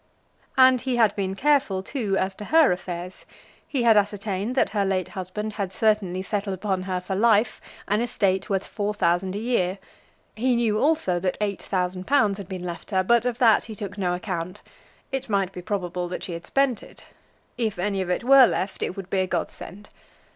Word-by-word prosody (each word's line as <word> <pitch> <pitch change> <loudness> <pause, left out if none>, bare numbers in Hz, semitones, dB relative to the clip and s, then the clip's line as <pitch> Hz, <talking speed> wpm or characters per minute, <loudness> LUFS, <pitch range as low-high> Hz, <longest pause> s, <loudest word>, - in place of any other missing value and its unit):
And 260 -1 +6
he 255 -1 -1
had 225 -4 +3
been 195 -1 -2
careful, 265 -7 +2
too, 205 -5 -2
as 190 +1 0
to 210 +2 -9
her 320 - +5
affairs. 180 0 -5 0.4
He 265 -4 -1
had 230 -2 +6
ascertained 205 +2 0
that - - +2
her 205 -2 +1
late 190 -2 -1
husband 205 +3 -5
had 200 -3 -3
certainly 195 -3 +1
settled 200 -1 -2
upon 190 0 -2
her 185 -1 0
for 180 +2 -5
life 215 +2 +2 0.3
an 210 +3 +1
estate 195 -5 0
worth 195 -1 0
four 210 -1 -3
thousand 180 +1 +1
a - - -2
year. 205 -5 0 0.6
He 245 +3 +1
knew, 225 -3 +1
also, 285 - +2
that 185 0 -1
eight 205 -2 -2
thousand 185 -1 -2
pounds 215 -8 +3
had 195 -2 -8
been 185 -2 -5
left 175 -1 -6
her, 190 -2 +1
but 235 +4 +3
of 240 -2 -2
that 230 -5 +4
he 220 - -8
took 200 -1 -6
no 180 -3 0
account. 180 +1 -5 0.5
It 270 -2 -3
might 195 -3 +1
be 180 - -8
probable 180 -2 -3
that 180 - -5
she 175 - -5
had 170 0 -7
spent 275 -5 +1
it. - - -14 0.5
If 225 -5 -2
any 195 +1 -1
of 185 - -3
it 180 - -1
were 265 0 +8
left, 190 +1 -3
it 185 - -3
would 195 -1 -8
be 195 - +1
a 185 - +1
godsend. 185 +3 -5
200 Hz, 205 wpm, -24 LUFS, 185-225 Hz, 0.6 s, were